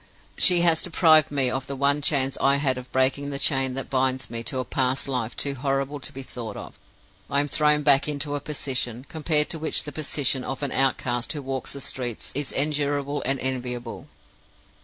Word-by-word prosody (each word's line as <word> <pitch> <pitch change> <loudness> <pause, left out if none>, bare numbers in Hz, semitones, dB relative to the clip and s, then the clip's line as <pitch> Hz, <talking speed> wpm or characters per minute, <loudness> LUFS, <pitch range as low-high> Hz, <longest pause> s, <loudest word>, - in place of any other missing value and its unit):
She 180 -2 +6
has 165 -2 +4
deprived 160 -3 +4
me 135 -3 +1
of 130 0 -3
the 140 - -4
one 140 +2 +2
chance 135 -2 +1
I 140 0 +4
had 135 -3 0
of 125 - -12
breaking 135 +2 +1
the 140 - -3
chain 135 -1 +1
that 135 - -5
binds 130 -1 0
me 115 -1 -3
to 130 +3 -1
a 130 - -2
past 130 +3 -1
life 125 -4 -3
too 140 - -1
horrible 135 +1 -2
to 140 - -6
be 135 -1 -7
thought 115 -5 -7
of. - - -10 0.5
I 140 - +2
am 145 - +1
thrown 150 0 +3
back 140 -1 +4
into 145 0 -2
a 145 - -1
position, 130 -4 -3
compared 155 -2 +1
to 165 - -2
which 155 - 0
the 145 - -5
position 140 -3 -1
of 135 +2 -5
an 140 - -1
outcast 125 -2 0
who 145 -2 -6
walks 135 0 -4
the 140 - -8
streets 125 -4 -3
is 140 0 -1
endurable 145 0 0
and 135 0 +1
enviable. 125 -2 -4
135 Hz, 200 wpm, -25 LUFS, 130-145 Hz, 0.5 s, She